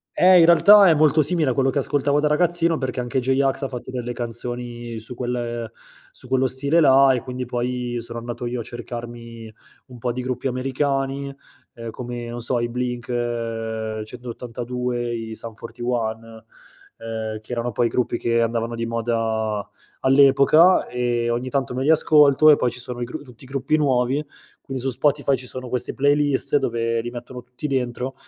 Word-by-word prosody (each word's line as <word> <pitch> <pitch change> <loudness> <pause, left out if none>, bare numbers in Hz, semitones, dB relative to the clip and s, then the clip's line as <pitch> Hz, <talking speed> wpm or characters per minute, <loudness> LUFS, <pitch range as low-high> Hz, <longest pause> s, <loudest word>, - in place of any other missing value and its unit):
Eh, 185 0 +6
in 165 - +7
realtà, 200 +4 +7
è - - +6
molto 155 0 +4
simile 155 -2 +1
a - - +1
quello 135 -1 +2
che 140 - 0
ascoltavo 145 +1 +1
da 150 - +2
ragazzino 170 +1 +2
perché 130 -2 -3
anche 125 +2 -1
J-Ax 135 +2 0
ha - - 0
fatto 125 -1 -8
delle 125 -1 -4
canzoni 120 -1 -5
su 120 +3 -9
quel 120 -2 -4 0.4
su - - -13
quello 130 0 +1
stile 140 +6 +4
là, 135 -3 +6
e 125 - -1
quindi, 125 -1 -5
poi, 125 0 -3
sono 115 0 -6
andato 120 +1 -6
io 120 0 -3
a - - -4
cercarmi 120 -1 -8 0.4
un 125 -1 -12
po' 120 +1 -2
di 125 +1 -4
gruppi 125 0 -4
americani, 135 +1 -2 0.4
uhm, 115 -1 -7
come, 120 0 -6
non 120 0 -6
so, 120 +1 +1
i 120 0 -2
Blink-182, 120 0 -4
i 110 - -6
Sum 115 -1 -6
41, 115 -1 -5 0.5
ehm, 110 -1 -5
che 110 - -14
erano, 120 0 -2
poi, 120 -1 +1
i - - -4
gruppi 120 -1 -1
che 115 0 +1
andavano 115 0 -2
di 115 0 -3
moda 115 -2 -2 0.3
all'epoca, 140 +6 +5
e 120 -1 -1
ogni 125 +2 -2
tanto 135 -3 -1
me 130 - -3
li 140 - +1
ascolto. 155 -1 +6
E, - - +7
poi, 125 - 0
ci 120 - -8
sono 125 0 -6
i - - 0
gru 125 - -7
tutti 125 -1 -15
i - - -14
gruppi 135 +3 0
nuovi, 135 0 +1 0.4
quindi 135 -1 -6
su 135 - 0
Spotify 140 +1 +1
ci 125 0 -8
sono 130 0 -6
queste 125 - -1
playlist 145 0 +2
dove 115 -3 -1
li 120 - -5
mettono 125 +1 -8
tutti 125 +4 -10
dentro, 130 -2 -2
125 Hz, 180 wpm, -22 LUFS, 120-135 Hz, 0.5 s, in